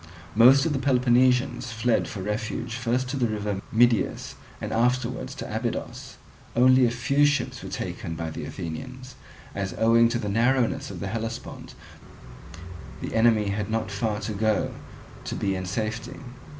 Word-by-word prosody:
Most 130 +6 +7
of 160 - +1
the 135 - -1
Peloponnesians 125 -1 +2
fled 115 +1 +1
for 95 - -6
refuge 110 +3 -3
first 125 +2 -1
to 135 - -2
the 125 -3 +2
river 105 -2 -3
Midius, 120 -1 +2 0.3
and - - -5
afterwards 125 +2 0
to - - -6
Abydos. - - -4 0.4
Only 130 +1 +6
a - - +1
few 125 +4 +1
ships 145 0 +1
were - - -7
taken 80 - -5
by 80 0 -4
the - - -6
Athenians; 130 +10 -7 0.4
as 100 -1 -3
owing 115 +1 +5
to 120 - -1
the 105 - -4
narrowness 130 +5 +1
of - - -8
the 100 - -3
Hellespont 115 +2 -6 1.2
the - - -5
enemy 110 -2 +3
had 105 +1 -2
not 110 -2 -2
far 105 +1 -1
to 110 - -3
go 110 0 0 0.5
to - - -4
be 100 -1 -1
in 95 -1 -4
safety. 110 +6 -4
115 Hz, 160 wpm, -25 LUFS, 105-125 Hz, 1.2 s, Most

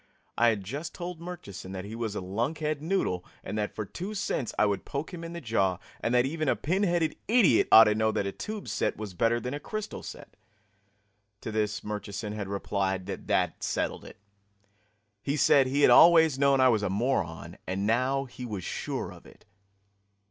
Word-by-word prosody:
I 120 - +4
had 110 -4 +1
just 145 - -6
told 175 -2 -6
Murchison 100 - -8
that 95 0 -5
he 105 - -8
was 115 -2 -3
a - - -3
lunkheaded 140 - -2
noodle 155 - -1 0.2
and 100 - -5
that 105 - -3
for 105 - -3
two 190 - -6
cents 140 - -2
I - - +4
would 100 -1 -1
poke 145 +6 -5
him 170 -1 -7
in 165 0 -6
the 170 - -5
jaw, 100 - +1 0.2
and 115 - -1
that 125 0 +4
even 155 +1 -1
a - - +3
pin 185 +6 -1
headed 170 -5 +1
idiot 215 - +4
ought 110 - +11
to 105 -1 +3
know 110 +1 +1
that 100 - -1
a 100 - -2
tube 210 - -6
set - - -1
was 105 -3 -6
better 115 +6 +2
than 125 +3 -4
a 145 - -3
crystal 215 +7 -5
set. - - -10 1.1
To - - -5
this 105 -1 -1
Murchison 105 0 -5
had 105 -2 -4
replied 95 -1 -2
that 100 - -6
that - - 0
settled - - -2
it. - - -12 1.0
He 140 +5 -1
said 135 -2 +5
he 140 +3 0
had - - +7
always 160 -4 +7
known 140 -1 +4
I 130 0 +6
was 110 -3 +2
a 105 - -1
moron, 95 -6 -2
and 95 +2 -2
now 130 +5 +1
he 125 0 -10
was 105 -6 -5
sure - - -4
of - - -15
it. - - -19
120 Hz, 205 wpm, -28 LUFS, 105-155 Hz, 1.1 s, ought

